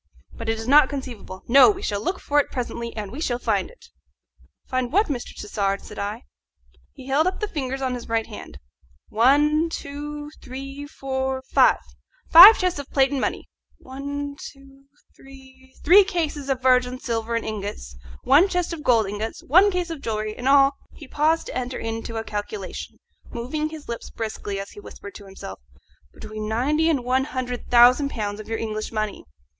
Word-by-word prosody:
But 230 -1 -6
it 225 - 0
is 225 +1 -6
not 285 0 +6
conceivable. 240 -9 -7
No! 275 +9 +7
we 400 -1 -2
shall 205 0 -2
look 360 +7 -2
for 290 0 +1
it 290 - 0
presently, 235 -2 -4
and 210 -2 -5
we 275 +6 -7
shall 245 -7 -1
find - - -1
it." - - -18 0.8
"Find 255 -2 -2
what, 405 +4 +2
Mr. 250 -4 -5
Tassard?" 200 -1 -2
said 210 - -10
I. 210 +4 -4 0.7
He 265 -3 -13
held 280 +5 +2
up 370 - -2
the 425 - -2
fingers 270 -6 -4
of 260 -1 -1
his 245 -2 -7
right 225 -1 0
hand: 215 - -10 0.5
"One, 295 +8 +3
two, 295 0 -6
three, 275 +2 -8
four, 265 -2 -3
five - - +5 0.5
five 375 +7 +11
chests 365 -5 -1
of 285 - -8
plate 270 -1 +2
and 275 -2 -1
money; - - -3 0.3
one, 285 +2 -6
two, 275 0 -13 0.3
three 265 -1 -17
three 380 +6 +7
cases 310 -7 -3
of 260 -1 -1
virgin 255 -1 +3
silver 230 -1 -2
in 230 - -1
ingots; 200 - -6 0.3
one 310 +9 +5
chest 360 -2 -1
of 325 - -6
gold 230 -6 +3
ingots; 210 +3 -5
one 370 +9 +5
case 360 -3 -2
of 315 -4 -6
jewellery. 215 -2 -3
In 250 - -5
all 275 0 +6
" - - -37
he 295 - -11
paused 310 +4 +1
to - - -8
enter 255 0 -3
into 225 0 -5
a 225 - -3
calculation, 215 - -6 0.3
moving 290 +6 -3
his 310 -2 -10
lips 235 0 -6
briskly 215 -3 -5
as 195 - -7
he - - -12
whispered 200 0 -11
to 205 - -11
himself 190 - -9 0.5
"between 215 0 -7
ninety 295 +8 +1
and 280 -6 0
one 260 +2 +1
hundred 255 -3 -5
thousand 250 +4 +6
pounds 210 -4 -4
of 215 - -10
your 225 - -1
English 215 -1 -4
money." 215 -2 -3
260 Hz, 185 wpm, -23 LUFS, 225-290 Hz, 0.8 s, five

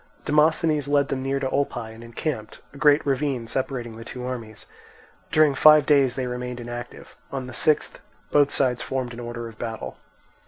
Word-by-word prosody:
Demosthenes 150 -1 +2
led 145 -1 +2
them 130 - -2
near 135 +1 -1
to 135 - -1
Olpae 120 -5 -2
and 115 +1 -12
encamped, 115 -1 -5
a - - -11
great 145 0 +4
ravine 135 -3 0
separating 120 -2 -3
the 115 - -8
two 125 +1 -7
armies. 115 -4 -6 0.7
During 155 -2 +5
five 150 +1 +7
days 140 -4 +4
they 130 - -2
remained 125 0 -4
inactive; 120 0 -8 0.2
on 135 -2 -4
the 130 - -9
sixth 155 +4 +1 0.3
both 145 -1 +4
sides 125 -3 +1
formed 130 -2 -3
in 120 - -8
order 120 -1 -5
of 115 -2 -13
battle. 115 -2 -5
130 Hz, 180 wpm, -24 LUFS, 120-145 Hz, 0.7 s, five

